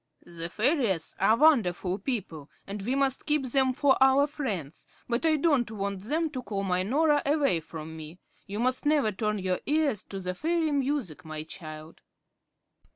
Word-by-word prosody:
"The 170 0 -4
fairies 220 - +1
are 215 +4 +4
wonderful 200 - +3
people, 195 - -4 0.2
and 200 +1 -6
we 245 +7 -1
must 275 -1 0
keep 300 -3 +1
them 265 -1 +3
for 265 +1 +3
our 265 +1 +6
friends, 210 - -5 0.2
but 245 +7 0
I 315 - +4
don't 285 -6 +2
want 200 -2 -3
them 310 - -1
to 260 -4 -4
call 200 -5 -4
my 185 -1 +1
Norah 290 +8 +2
away 280 - +2
from 160 0 -9
me. 160 +2 -9 0.3
You 205 +2 -5
must 255 +1 0
never 290 -7 +2
turn 210 +1 -1
your 185 -2 -1
ears 290 -7 +1
to 195 - -6
the 180 -1 -3
fairy 325 - 0
music, 265 - -1
my 155 -1 -6
child." 155 0 -10
220 Hz, 170 wpm, -28 LUFS, 180-285 Hz, 0.3 s, our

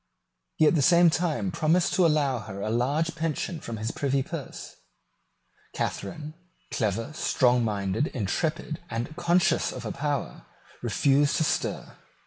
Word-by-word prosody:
He 155 - +4
at 150 - +5
the 160 - +2
same 170 +3 +6
time 175 +3 -1
promised 170 +1 +2
to 180 -3 +4
allow 145 -5 +1
her 100 -2 -8
a 105 +2 -2
large 140 +8 0
pension 165 +1 -3
from 115 -5 -6
his 110 +2 -3
privy 135 -1 0
purse. - - -8 1.0
Catharine, 150 +10 -4 0.4
clever, 110 +3 -1
strongminded, 120 -4 +1
intrepid, 155 - -2
and 120 +7 -4
conscious 175 +1 +2
of - - -7
her - - -4
power, - - -3 0.3
refused 140 +1 +2
to - - +2
stir. - - -2
145 Hz, 135 wpm, -27 LUFS, 115-160 Hz, 1.0 s, same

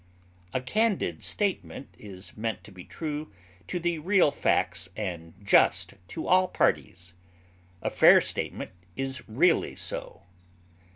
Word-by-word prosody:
A 130 - 0
candid 195 - 0
statement 195 -8 -2
is 95 -2 -10
meant 110 0 -3
to 105 - -14
be 95 -2 -11
true 155 -4 -5 0.4
to 180 - -2
the 170 -1 -1
real 180 -1 +4
facts 95 - 0
and 85 -5 -5
just 100 - +4
to 160 - -6
all 185 0 +4
parties; 90 - -1 0.7
a - - -1
fair - - +7
statement - - -4 0.2
is 135 -1 -3
really 165 +10 +2
so. 90 - -6
135 Hz, 125 wpm, -27 LUFS, -, 0.7 s, fair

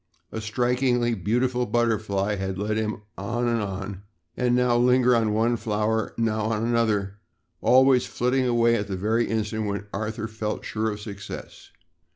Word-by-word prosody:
A 110 - -4
strikingly 120 +2 +1
beautiful 125 +5 0
butterfly 110 -4 0
had 95 -1 -3
led 105 +2 -1
him 110 -1 -2 0.2
on 120 +5 -1
and 115 -1 +1
on, 95 -1 -5 0.3
now 125 0 +2
lingering 125 0 +4
on 105 - 0
one 115 +2 +2
flower, 110 0 -1
now 110 -2 0
on 110 0 0
another, 105 -4 0 0.4
always 130 0 +5
flitting 125 +1 0
away 120 -1 +3
at 100 - -3
the 95 -2 -3
very 110 +5 +1
instant 110 -1 -2
when 100 0 -3
Arthur 110 +2 -3
felt 110 -1 -4
sure 110 0 -1
of 105 -1 -5
success. 100 -2 -9
110 Hz, 155 wpm, -25 LUFS, 105-120 Hz, 0.4 s, always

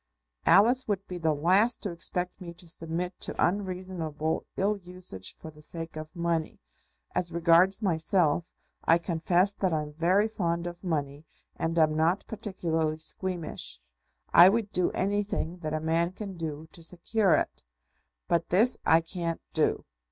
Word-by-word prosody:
"Alice 245 +6 +5
would 200 -2 -2
be 180 -1 -7
the 160 -2 +1
last 185 +10 +3
to 200 - -2
expect 180 +2 -1
me 170 -1 -8
to 175 0 -6
submit 170 +2 -4
to - - -1
unreasonable 180 -5 -1
ill 200 +2 +1
usage 180 - -5
for 160 - -10
the 150 0 -17
sake 165 +1 -5
of 155 +2 -8
money. 170 -2 -1 0.6
As 175 -1 0
regards 170 +5 +3
myself, 170 -2 +1 0.3
I 165 - +5
confess 175 +3 +1
that 190 -2 -1
I'm 150 -2 -2
very 180 +7 +2
fond 170 -5 -2
of 175 +1 -7
money 145 -4 -3 0.3
and 165 +1 -2
am 155 -1 +3
not 165 +5 +1
particularly 170 -8 -2
squeamish. 165 - -1 0.5
I 175 +2 +9
would 215 0 -1
do 180 - +2
anything 195 -3 -1
that 155 -3 -4
a - - -1
man 165 +3 0
can 195 -1 -7
do 160 -2 -6
to 175 - -6
secure 180 +3 +1
it. - - -2 0.6
But 170 -1 0
this 225 +7 +5
I 165 +1 +5
can't 165 -1 -3
do. - - 0
170 Hz, 155 wpm, -28 LUFS, 160-190 Hz, 0.6 s, I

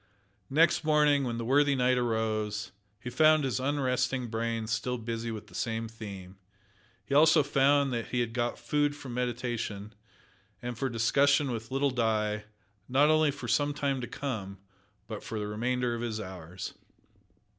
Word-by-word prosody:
Next 165 +4 +3
morning, 150 -2 +3
when 120 -2 -2
the 115 - -3
worthy 140 +3 +4
knight 125 -1 +2
arose, 110 -3 -1 0.3
he 125 +2 -6
found 155 +2 +5
his 130 -1 -1
unrested 130 -3 0
brain 115 0 -2
still 115 +3 -1
busy 115 0 -4
with 110 -2 -6
the - - -19
same 115 0 -2
theme. 100 -4 -9 0.7
He - - -4
also 155 +1 +6
found 140 0 +3
that 115 -1 -2
he 125 - -1
had 120 -2 -1
got 120 0 -1
food 145 -1 0
for 140 -2 -9
meditation, 120 -4 -3 0.7
and 125 0 -5
for 135 +3 -2
discussion 140 +4 +3
with 115 -1 -5
little 135 +1 +1
Di, 110 -3 0 0.4
not 145 +4 +4
only 155 -1 +4
for 140 - -5
some 145 0 +1
time 140 -3 -1
to 120 - -4
come, 105 -9 -5 0.5
but, - - -7
for 110 - -5
the 105 - -2
remainder 120 +3 -1
of 115 - -4
his 115 -2 -3
hours. 90 -2 -7
125 Hz, 165 wpm, -29 LUFS, 110-140 Hz, 0.7 s, also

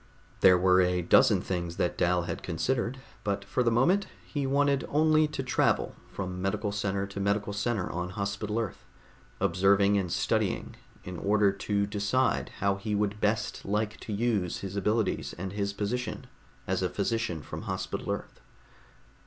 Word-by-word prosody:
There 90 -1 +7
were 90 +1 +5
a 90 0 +1
dozen 85 - +5
things 85 -2 -3
that 90 - 0
Dal 90 0 +2
had - - -4
considered, 115 +9 -1 0.3
but 100 -1 -2
for 125 - 0
the 120 - +3
moment 170 - +3 0.2
he 140 -3 -2
wanted 140 0 +2
only 155 +1 +4
to 140 -3 -4
travel 125 - +1 0.2
from 90 -2 -4
medical 105 +2 -1
center 100 -1 -1
to 100 0 -7
medical 100 +1 0
center 105 -2 -1
on 90 +1 -3
Hospital 100 +2 -3
Earth, 115 -4 -3 0.6
observing 100 +2 +3
and 90 -3 -3
studying - - 0 0.3
in 90 -1 -6
order 100 0 +3
to 100 +1 -1
decide 105 +5 0
how 100 0 +1
he 105 +1 -2
would 105 +1 -1
best 105 +1 0
like 105 +2 -1
to - - -7
use 105 -4 0
his 95 0 -5
abilities 105 +2 0
and 95 +2 -5
his 100 -1 -1
position 110 +4 -3 0.4
as - - -1
a 90 - +1
Physician 100 -4 -1
from - - -7
Hospital - - -3
Earth. - - -6
100 Hz, 160 wpm, -29 LUFS, 95-110 Hz, 0.6 s, There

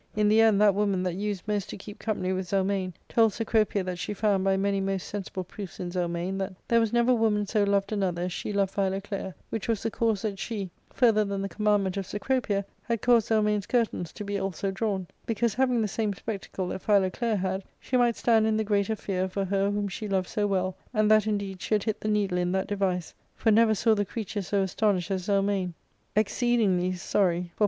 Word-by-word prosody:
In 210 0 +3
the 220 +1 +5
end, 220 -3 +5
that 210 -1 +6
woman 200 -2 +1
that 180 -2 -1
used 205 +1 -3
most 205 -2 -1
to - - -6
keep 205 +2 -10
company 190 -4 -1
with 185 -1 -3
Zelmane 190 0 0
told 225 -3 +3
Cecropia 220 -3 +1
that 180 -1 -4
she 210 - -3
found 200 -2 +1
by 195 0 +2
many 195 0 +1
most 195 -3 -2
sensible 190 -2 -5
proofs 190 +1 -9
in 175 -1 -4
Zelmane 175 +1 -2
that 190 0 -3
there 235 - +4
was 225 -2 +1
never 240 +1 +3
woman 220 -3 +2
so 210 +1 +1
loved 200 0 +1
another 185 -4 -1
as 180 -1 -2
she - - -4
loved 200 -2 0
Philoclea, 195 -1 -2 0.2
which 225 - -3
was 225 -3 0
the 225 - -1
cause 220 -2 0
that 200 -3 -3
she, 200 -5 -4 0.2
further 225 -4 +4
than 200 -1 -3
the - - -1
commandment 205 -3 +1
of 195 -2 -3
Cecropia, 205 -2 -1 0.2
had 230 -3 -3
caused 235 -2 +4
^Zelmane's 210 -2 +2
curtains 225 -8 0
to 210 - -6
be 200 0 -2
also 195 +1 -2
drawn; 195 -1 -2 0.2
because, 230 0 0
having 250 -2 +2
the - - 0
same 210 0 -1
spectacle 190 -2 -5
that 190 - -4
Philoclea 210 +3 +2
had, 190 0 -2 0.2
she 255 - -3
might 240 -2 +3
stand 225 -2 +3
in 215 -1 +2
the 220 - +1
greater 205 0 +1
fear 190 -2 -2
for 195 +1 -2
her 195 +1 +1
whom 205 0 -1
she 210 +3 -5
loved 190 -2 0
so 210 -1 0
well, 185 -2 0 0.2
and 215 0 +3
that 215 -1 +5
indeed 200 -3 -2
she 215 - +1
had 210 - 0
hit 220 -2 -2
the - - -3
needle 200 -4 +1
in 180 0 0
that 190 0 0
device; 190 -4 -1 0.2
for 225 - +2
never 220 0 +5
saw 220 +2 +3
she 205 - +1
creature 210 0 -4
so 195 +1 0
astonished 190 -1 0
as 185 -2 -2
Zelmane, 195 -3 +1 0.4
exceedingly 210 -4 +2
sorry 185 +1 +1
for 170 0 -1
ARCADIA. 175 - -11
200 Hz, 225 wpm, -27 LUFS, 190-215 Hz, 0.4 s, that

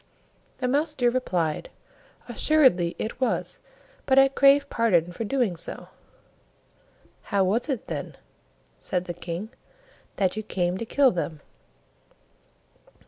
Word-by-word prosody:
The 255 - -2
Mouse 295 +4 0
deer 245 -3 +2
replied, 180 -11 -1 0.6
"Assuredly 255 - +3
it 235 +4 -5
was, 255 - -1 0.5
but 265 - +3
I 270 0 +7
crave 275 +1 +4
pardon 180 - +1
for 180 - -5
doing 230 -4 0
so." 165 - -7 1.4
"How 200 -1 +1
was 220 +9 0
it, 260 -6 -2
then," - - -5 0.6
said 180 -2 -2
the 175 - -4
King, 175 +4 -6 0.7
"that 190 -1 0
you 215 - -3
came 185 -3 -2
to 230 - -4
kill 275 0 +4
them?" 165 -3 -4
220 Hz, 125 wpm, -25 LUFS, 175-265 Hz, 1.4 s, I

